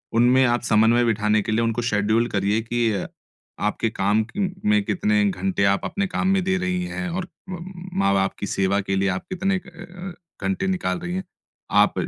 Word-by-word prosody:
उनमें 125 +3 +5
आप 120 0 +2
समन्वय 115 +1 +4
बिठाने 105 -1 +2
के 110 - -3
लिए 115 +2 +2
उनको 115 +1 0
शेड्यूल 110 0 +1
करिए 100 +2 +1
कि 120 0 0
अ, 100 -3 -2 0.5
आपके 105 +2 0
काम 105 +1 +1
की 115 - -9
म 195 -2 +1 0.2
में 210 -1 +4
कितने 210 +2 +1
घंटे 190 - -1
आप - - -2
अपने 200 0 -1
काम 185 - -1
में 190 0 +3
दे 190 +1 +1
रही 180 0 -1
हैं 180 0 -4
और 180 +1 -3 0.2
मम 180 0 -6 0.3
माँ-बाप 100 - +2
की 100 - -3
सेवा 100 -1 +1
के 95 0 -2
लिए 100 +1 +1
आप - - -8
कितने 190 +1 0
क - - -15
अ 175 +1 -10
अ, - - -10 0.3
घंटे 195 0 -1
निकाल 185 -1 -1
रही 175 0 -5
हैं। 190 - -2 0.5
आप - - +4
120 Hz, 210 wpm, -23 LUFS, -, 0.5 s, उनमें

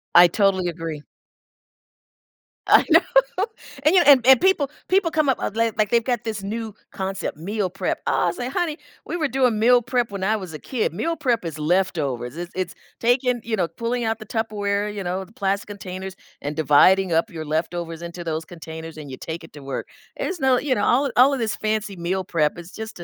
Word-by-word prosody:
I 175 0 +10
totally 190 -1 +1
agree. 165 -3 -6 1.6
I - - +7
know, - - +8 0.8
and, 305 +4 +4
you 365 -2 +6
kn - - -2
and 260 -4 +7
and 265 +1 +8
people 365 -7 +3 0.2
people 370 -3 +2
come 310 -2 +2
up, 260 - +2
uh, - - -2
li 230 +1 +1
like 215 -2 +1
they've 235 -1 +3
got 245 -2 -1
this 220 -3 -4
new 220 +2 -4 0.2
concept, 190 -3 -4
"meal 195 +4 -2
prep." 185 0 -2
"Ah," - - +2
I - - 0
say, 245 +8 -4
"Honey, 320 +1 -2 0.3
we - - -3
were 310 -3 +1
doing 255 -5 +1
meal 245 +2 +5
prep 245 0 0
when 200 -2 -5
I 215 +3 +2
was 185 -6 -6
a 155 - -7
kid." 245 - -2
Meal 330 - -1
prep 245 - 0
is 160 -2 -5
leftovers, 150 -7 0
it's 175 +1 -6
it's 185 -1 -2 0.3
taking, 245 +1 +2
you 225 -1 -1
know 180 -5 0
pulling 230 +8 -3
out 225 0 0
the 215 - -9
Tupperware- 210 -2 -1
you 200 - -4
know, 185 +2 -3
the 190 - -21
plastic 200 0 -1
containers- 190 -2 -7 0.3
and 145 +1 -4
dividing 165 +5 +4
up 165 +7 +2
your 160 -5 -6
leftovers 165 +2 -3
into 170 +1 -7
those 160 -1 -3
containers, 160 -1 -9
and 145 -3 -8
you 130 - -7
take 165 +1 -6
it 165 - -14
to 145 - -10
work. 135 0 -5 0.3
It's 365 -2 -3
no 265 -3 +3
you 275 0 0
know, 205 - 0
all 265 +4 +3
of 275 - -1
all 260 +3 +7
of 275 - -1
this 225 -2 -1
fancy 215 -2 -2
meal 180 +2 -2
prep, 165 -4 0
it's 175 +1 -10
just 220 -3 -8
a - - -6
200 Hz, 220 wpm, -23 LUFS, 170-240 Hz, 1.6 s, I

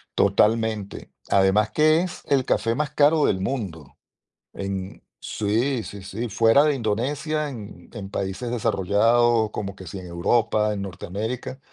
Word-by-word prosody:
Totalmente. 105 0 +1 0.2
Además 100 +3 +3
que 155 +2 +4
es 180 -2 -5
el 135 -3 +2
café 115 +2 +1
más 150 0 -1
caro 150 +1 +4
del 95 - +1
mundo 95 - -4 0.6
en 95 -1 -5 0.3
Sí, 115 +5 0
sí, 100 -2 -9
sí, 110 +5 -5
fuera 115 +7 +4
de 150 -2 +2
Indonesia, 140 +7 -1
en 105 -8 -10
en 100 0 -7
países 100 +6 -3
desarrollados, 115 +1 +2
como 100 -2 -5
que 95 -3 -11
si 95 - -7
en 90 - -8
Europa, 105 +5 +1
en 100 -1 -3
Norteamérica, 105 +8 -5
110 Hz, 145 wpm, -24 LUFS, 100-125 Hz, 0.6 s, que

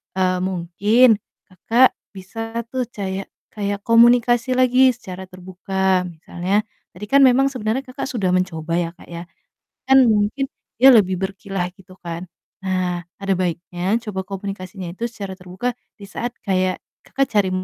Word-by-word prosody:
eee, 185 -1 +1
mungkin 200 +6 +3 0.3
Kakak 230 +7 +3 0.2
bisa 225 +5 -5
tuh 255 0 -2
cayak 195 -2 -4 0.3
kayak 205 -1 -3
komunikasi 240 +2 +4
lagi 255 +1 +5
secara 190 -6 -9
terbuka. 185 0 -1
Misalnya, 180 +5 -2 0.3
tadi 195 +4 -8
kan 280 +3 +5
memang 265 +1 +5
sebenernya 230 +1 -1
Kakak 255 +2 -5
sudah 215 -9 -1
mencoba 170 -3 -1
ya, 175 -1 0
Kak, - - -16 0.8
kan 265 0 +6
mungkin 215 +5 +1 0.3
dia 265 +2 +9
lebih 190 -4 +4
berkilah 195 -1 -3
gitu 185 0 -17
kan. 170 +1 -6 0.4
Nah, 185 -2 -1 0.2
ada 195 -1 0
baiknya 180 +2 -1
coba 195 -4 -4
komunikasinya 195 -1 -6
itu 230 - -3
secara 200 -4 -7
terbuka 185 +7 -3 0.3
di - - -11
saat 240 +5 -4
kayak 185 -2 0 0.3
Kakak 275 0 0
cari 200 -2 +3
195 Hz, 140 wpm, -21 LUFS, 185-235 Hz, 0.8 s, dia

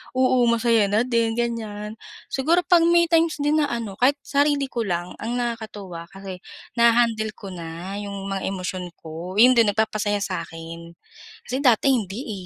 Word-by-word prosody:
oo, 255 -2 +3
masaya 230 -2 +3
na 210 +4 +2
din, 230 -2 0
ganiyan. 220 -3 -3 0.4
Siguro 330 +7 +2
'pag 340 -1 +4
may 340 0 +5
times 330 -1 +3
din 300 +1 +2
na 295 - +2
ano, 225 -5 -5
kahit 270 +3 +4
sarili 285 -1 +1
ko 235 - -4
lang, 175 0 -2
ang 235 +3 -3
nakakatuwa 215 -8 -5
kasi, 195 -2 -8 0.4
naha-handle 230 -2 +3
ko 195 -2 -9
na 175 +3 -6
yung 200 -1 -6
mga 195 - -2
emosyon 185 -2 -4
ko, 165 +4 -8
yun 250 +2 +8
din 230 -2 +5
nagpapasaya 210 -1 0
sa 185 - -2
'kin. 165 0 -10 0.5
Kasi 260 +2 -2
dati 250 +2 +4
hindi 210 -3 -3
220 Hz, 165 wpm, -23 LUFS, 195-245 Hz, 0.5 s, yun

